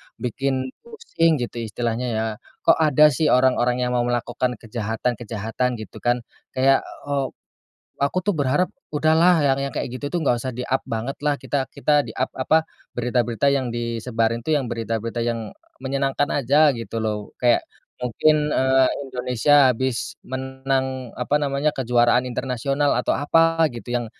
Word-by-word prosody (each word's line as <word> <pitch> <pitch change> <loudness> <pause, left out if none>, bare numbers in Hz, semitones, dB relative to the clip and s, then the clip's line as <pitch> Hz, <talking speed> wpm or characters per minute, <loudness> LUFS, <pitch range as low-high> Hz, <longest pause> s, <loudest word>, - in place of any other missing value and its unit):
bikin 130 +1 -2
pusing 445 - 0
gitu 120 -3 -4
istilahnya 120 +2 -2
ya, 110 - 0 0.4
kok 165 - +4
ada 150 -1 +5
sih 155 +3 +1
orang-orang 125 -2 +3
yang 125 - -1
mau 120 - +2
melakukan 120 +1 -1
kejahatan-kejahatan 115 0 -2
gitu 110 - -9
kan, 120 0 0 0.3
kayak, 135 +1 +4 0.3
eee, 140 -2 0 0.8
aku 140 +6 +1
tuh 205 +2 0
berharap 145 +5 +1 0.2
udahlah 160 +3 +4
yang 135 -1 +2
yang 140 -1 -3
kayak - - -2
gitu 145 +3 -5
tuh 175 - +1
nggak 130 -5 +2
usah 130 - -3
di-up 125 +2 -2
banget 115 +4 -4
lah, 150 -1 +2
kita 140 +1 -2
kita 150 -1 +2
di-up 130 - -3
apa, 160 +5 +2 0.3
berita-berita 120 +1 0
yang 130 -3 -1
disebarin 115 0 -1
tuh 160 - 0
yang 135 - -3
berita-berita 115 0 -3
yang, 115 0 -1 0.2
eee, - - -36
menyenangkan 135 +1 0
aja 140 +1 +2 0.2
gitu 115 0 -5
loh. 105 -2 -3
Kayak 120 -1 +3 0.3
mungkin, 150 +5 +1
eee, 130 0 +3 0.2
Indonesia 130 +2 +3
habis 130 0 -3
menang 130 -1 -3
apa 140 +4 0
namanya, 145 +1 0
kejuaraan 125 -1 +2
internasional 135 +3 -1
atau - - 0
apa 165 +3 +3
gitu, 120 +1 -9
yang 120 - -2
130 Hz, 150 wpm, -22 LUFS, 120-145 Hz, 0.8 s, ada